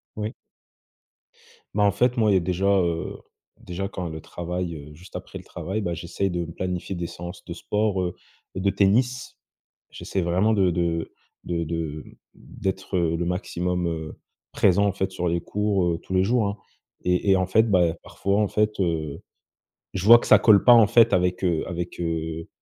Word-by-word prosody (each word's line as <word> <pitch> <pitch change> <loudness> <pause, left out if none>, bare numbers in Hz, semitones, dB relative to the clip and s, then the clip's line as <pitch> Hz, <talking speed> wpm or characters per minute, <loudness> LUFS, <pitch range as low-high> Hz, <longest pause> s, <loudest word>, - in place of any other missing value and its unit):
Oui. 105 +1 -4 1.4
Bah 105 - +2
en 100 - +5
fait, 125 +5 +1
moi, 110 -2 +3
il - - +4
y - - +6
a - - +3
déjà, 90 +2 -1
heu, 85 -4 +1 0.4
déjà 90 +2 -5
quand 90 -3 -5
le 80 -1 -7
travail, 85 0 -4
heu, 75 0 -10
juste 90 +5 -15
après - - -7
le - - -13
travail, 100 +4 -4
bah 85 -4 -2
j'essaye 95 +3 -2
de 85 -1 -2
me 85 - -9
planifier 90 +2 -4
des 85 -1 -3
séances 85 +3 -9
de 85 - -6
sport, 105 +2 -1
heu, 90 -1 -2 0.4
de 95 +1 +1
tennis. 120 +6 +1 0.5
J'essaie 95 - -3
vraiment 95 +6 +2
de 95 -3 +3
de 85 -1 -1 0.3
de 85 -1 -1
de 80 -2 -4 0.3
d'être, 95 0 -5
heu, 85 -2 +1
le 85 - -2
maximum, 90 -1 -2
heu, 80 -2 -5 0.3
présent, 100 +2 +3
en - - +2
fait, 95 -1 -2
sur 90 -1 -2
les 85 0 0
cours, 100 0 0
heu, - - -2
tous - - -7
les 95 0 +3
jours, 115 +1 +2
hein 100 +1 -4 0.5
et 90 +2 +2
et - - +6
en 95 -1 0
fait, 110 +4 +4
bah, 85 -3 +3
parfois 100 +1 -1
en 105 - +2
fait, 105 0 0
heu, 80 -5 -2 0.7
je 95 - -2
vois 115 +2 +9
que - - -6
ça - - +8
colle 105 -3 +6
pas 120 - +8
en 115 -3 +7
fait, 115 +1 +5
avec, 90 +1 +1
heu, 85 -3 +1
avec, 85 -1 -5
heu 80 -1 -3
90 Hz, 195 wpm, -24 LUFS, 85-100 Hz, 1.4 s, vois